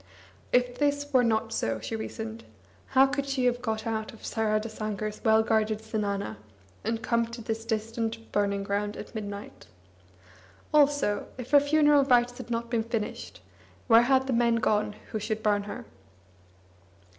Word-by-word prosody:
If 245 0 +2
this 285 0 0
were 255 -1 +5
not 225 -1 +1
so, 115 - -1
she 165 - -4
reasoned, 225 0 -6 0.4
how 265 0 +5
could 280 0 -2
she 270 -2 0
have 245 0 +1
got 220 -2 -2
out 220 -1 -2
of 225 - -12
Saradasankar's 215 -1 -2
well 220 -1 +5
guarded 220 -1 +1
zenana, 200 - -2 0.5
and 225 +2 -2
come 235 -1 +1
to 230 +1 -8
this 225 0 -4
distant 225 0 -2
burningground 200 0 -1
at - - -9
midnight? 205 -2 -7 1.1
Also, 285 -8 +3
if 250 -1 -8
her 290 - +8
funeral 295 0 +4
rites 245 -1 +3
had 245 - -8
not 235 0 -2
been 230 -2 +2
finished, 225 -2 -4 0.4
where 230 -1 +7
had 265 +2 +3
the 265 - -1
men 235 0 +3
gone 210 -2 +1 0.2
who 215 - -2
should 215 +1 -3
burn 205 -1 +2
her? 235 +3 -7
225 Hz, 155 wpm, -28 LUFS, 215-245 Hz, 1.1 s, her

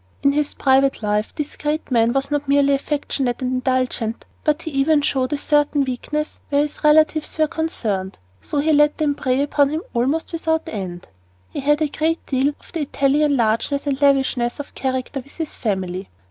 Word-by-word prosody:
In 280 - +5
his 295 0 0
private 270 -2 +2
life 210 +1 0
this 300 -1 -4
great 300 -1 -3
man 230 -1 +3
was 270 +2 -1
not 290 -1 -1
merely 280 0 +4
affectionate 275 -3 -1
and 255 - -1
indulgent, 255 -3 -1 0.2
but 300 +1 +1
he 320 - -5
even 285 +2 +3
showed 265 -2 0
a 295 - 0
certain 295 0 +2
weakness 300 +4 -4
where 285 0 +3
his 295 - -7
relatives 310 +1 +3
were 310 - +4
concerned, 215 - -3 0.2
so 295 - -4
that 285 - +2
he 315 0 +3
let 295 0 +4
them 300 -2 +1
prey 265 -1 0
upon 285 -1 +2
him 315 +4 -3
almost 275 +9 0
without 320 -1 0
end. 180 -4 -6 0.4
He - - -4
had 295 +2 +2
a - - +2
great 320 +3 -1
deal 265 0 +1
of - - -18
the 335 - -2
Italian 285 0 +2
largeness 235 +5 0
and 280 -1 -1
lavishness 270 -3 +2
of 290 - -7
character 260 +1 -2
with 275 +2 -13
his 320 -2 -3
family. 190 -4 -3
280 Hz, 190 wpm, -21 LUFS, 255-300 Hz, 0.4 s, In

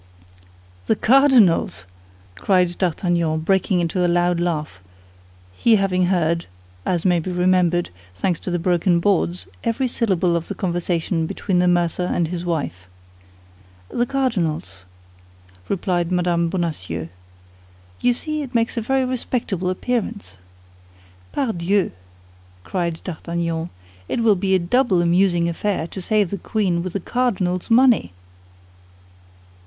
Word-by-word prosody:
"The - - +3
cardinal's?" 245 - +4 0.5
cried 180 - +1
D'Artagnan, 170 -3 0
breaking 190 +1 +1
into 175 +2 0
a - - +3
loud 175 0 +2
laugh, 155 - -2 0.7
he 225 - +4
having 185 -3 +1
heard, 170 -2 0 0.4
as 175 -1 0
may 175 -2 +3
be 180 +3 -4
remembered, 180 - +2 0.2
thanks 170 - -1
to - - -6
the 175 - 0
broken 175 0 +2
boards, 180 -1 +1 0.2
every 235 +3 0
syllable 190 -8 +1
of 170 -1 -2
the - - -5
conversation 170 -2 -1
between 185 +1 -1
the 180 - +3
mercer 175 0 +1
and 170 -3 0
his 175 0 -4
wife. 145 - -3 1.0
"The 240 0 -1
cardinal's," 165 - -2 0.8
replied 180 -2 -1
Mme. 175 -1 +1
Bonacieux. 95 - -3 0.9
"You 245 - +3
see 305 +5 -3
it 265 -4 -7
makes 230 +1 +1
a - - +1
very 265 +3 +1
respectable 230 -7 -2
appearance." 215 - -3 0.9
"Pardieu," 200 -6 0 0.7
cried 170 - -3
D'Artagnan, 170 -1 -3 0.4
"it - - -1
will 220 -3 +4
be 190 0 +1
a - - +5
double 185 +2 +2
amusing 175 0 +3
affair 170 0 -1
to 190 +3 -7
save 205 0 +1
the 200 - -3
queen 185 -4 0
with 180 0 -5
the 200 - -1
cardinal's 190 -5 -1
money!" 235 - +4
180 Hz, 125 wpm, -21 LUFS, 170-205 Hz, 1.0 s, a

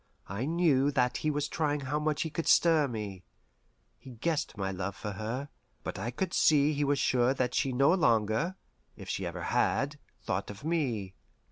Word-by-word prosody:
I 100 +6 -3
knew 155 -4 +3
that 125 -3 +1
he 155 - -1
was 145 -1 -1
trying 150 -2 -1
how 140 +2 -1
much 150 -1 0
he 160 - -5
could 165 - -3
stir 160 -4 +5
me. 105 -6 -5 0.8
He - - -12
guessed 145 +6 -2
my 95 -1 -2
love 95 +1 -4
for 105 - -5
her, 115 +8 -4 0.3
but - - -5
I 110 +4 -2
could 185 +10 -3
see 150 0 +4
he 145 0 0
was 145 0 +2
sure 125 0 +2
that 125 -2 0
she 135 - +1
no 135 +6 +4
longer 120 - +2 0.4
if - - -10
she - - -2
ever - - -5
had 145 +2 0 0.2
thought - - -3
of 105 +4 -9
me. 125 - -1
135 Hz, 190 wpm, -30 LUFS, 110-150 Hz, 0.8 s, stir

